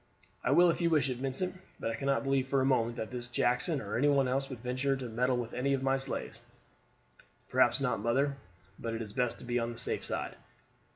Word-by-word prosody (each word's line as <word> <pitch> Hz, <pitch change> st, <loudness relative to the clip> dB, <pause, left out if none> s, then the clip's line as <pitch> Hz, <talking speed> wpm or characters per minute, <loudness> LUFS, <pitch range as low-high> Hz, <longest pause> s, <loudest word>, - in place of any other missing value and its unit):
"I -, -, 0 dB
will 175 Hz, 0 st, +6 dB
if 170 Hz, -, -3 dB
you 170 Hz, -, +3 dB
wish 145 Hz, -5 st, +2 dB
it, 125 Hz, -, -4 dB
Vincent; 160 Hz, +8 st, -2 dB, 0.2 s
but 115 Hz, -, -1 dB
I -, -, -3 dB
cannot 140 Hz, 0 st, 0 dB
believe 135 Hz, -1 st, +1 dB
for 135 Hz, 0 st, +2 dB
a 130 Hz, -, +2 dB
moment 120 Hz, -3 st, +2 dB
that 110 Hz, -2 st, -5 dB
this 125 Hz, -1 st, -4 dB
Jackson 125 Hz, +5 st, +1 dB
or 105 Hz, -4 st, -4 dB
any 145 Hz, -, +4 dB
one 140 Hz, -2 st, +4 dB
else 135 Hz, +2 st, 0 dB
would 130 Hz, -, -6 dB
venture 130 Hz, +3 st, 0 dB
to 130 Hz, -2 st, -5 dB
meddle 125 Hz, +3 st, +1 dB
with 120 Hz, -2 st, -4 dB
any 140 Hz, +2 st, +1 dB
of 135 Hz, -, -4 dB
my 135 Hz, 0 st, +3 dB
slaves." 135 Hz, -, -5 dB, 1.1 s
"Perhaps 125 Hz, -, +4 dB
not, 135 Hz, -6 st, 0 dB
mother; 135 Hz, +5 st, +1 dB, 0.4 s
but 115 Hz, -1 st, -3 dB
it 115 Hz, -, -3 dB
is 105 Hz, -2 st, -9 dB
best 125 Hz, 0 st, 0 dB
to -, -, -11 dB
be 120 Hz, 0 st, 0 dB
on 115 Hz, 0 st, -2 dB
the 115 Hz, -, -9 dB
safe 120 Hz, -, 0 dB
side. -, -, -2 dB
130 Hz, 235 wpm, -31 LUFS, 120-135 Hz, 1.1 s, will